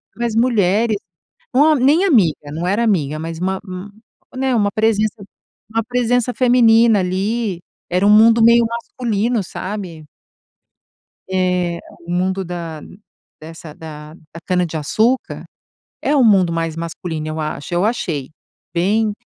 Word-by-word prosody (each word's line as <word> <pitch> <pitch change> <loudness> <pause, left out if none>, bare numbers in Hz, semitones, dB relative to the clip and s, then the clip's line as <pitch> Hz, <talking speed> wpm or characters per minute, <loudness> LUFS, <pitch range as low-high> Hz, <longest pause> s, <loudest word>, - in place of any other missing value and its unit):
mais 235 -2 -2
mulheres, 220 -2 +2 0.6
uma 300 +4 +5
nem 290 +7 +3
amiga, 175 - +2
não 170 +3 -3
era 205 +5 +1
amiga, 155 -9 0
mas 165 0 -6
uma 190 +1 -2
um 185 +1 -7 0.5
né, 260 -1 0
uma 205 -2 +1
presença 215 -1 0 0.5
uma 225 +1 -1
presença 245 +1 0
feminina 230 -3 +4
ali. 190 +1 -2 0.3
Era 185 +2 +2
um - - +5
mundo 225 +2 +6
meio 235 0 +6
masculino, 230 -1 -2
sabe? 185 -5 -7 1.2
Eh, 180 -2 0 0.3
o 175 - -5
mundo 185 +2 0
da 165 -3 -6 0.6
dessa 160 0 -11
da 150 -1 -10
da 160 0 -14
cana-de-açúcar 180 - 0 0.6
é 295 - +1
o 275 - +4
mundo 195 -6 +4
mais 165 -1 -2
masculino, 165 -1 -5
eu 155 +1 -4
acho 155 +1 -5
eu 175 +2 +1
achei 165 - -2 0.4
bem 205 +5 +1
195 Hz, 130 wpm, -18 LUFS, 170-230 Hz, 1.2 s, mundo